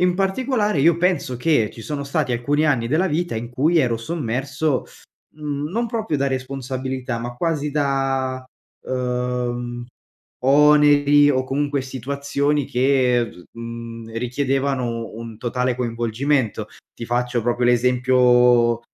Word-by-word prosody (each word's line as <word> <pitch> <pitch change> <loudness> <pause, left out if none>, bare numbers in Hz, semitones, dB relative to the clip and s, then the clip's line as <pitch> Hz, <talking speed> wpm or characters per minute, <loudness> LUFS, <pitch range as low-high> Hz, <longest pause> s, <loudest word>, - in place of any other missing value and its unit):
In 180 0 +3
particolare 205 - 0
io 165 +3 +4
penso 180 -8 0
che 125 -7 +2
ci 115 - -11
sono 140 +5 -4
stati 140 -3 -1
alcuni 145 +6 +1
anni 125 -6 +1
della 160 +9 +1
vita 165 -4 -1
in 115 +1 -4
cui 155 +7 +2
ero 120 -5 +2
sommerso, 135 +2 -2 0.5
mhmm, 150 0 -4
non 235 +4 -1
proprio 220 -10 -2
da 140 - +1
responsabilità, 130 -1 -3
ma 120 +1 -5
quasi 150 0 -1
da, 135 -2 -1 0.4
uhm, 125 -1 -3 0.6
oneri, 145 +1 +5
o 130 -1 +1
comunque 140 +1 -1
situazioni 140 +2 -2
che 125 -1 +2 0.3
v - - -13
mhmm, 115 -1 -8
richiedevano 130 -2 -1
un 115 -1 -8
totale 125 +1 -1
coinvolgimento. 120 +1 -1 0.3
Ti 115 - -7
faccio 120 0 -1
proprio 120 +1 0
l'esempio 125 -1 +4
130 Hz, 125 wpm, -21 LUFS, 120-145 Hz, 0.6 s, oneri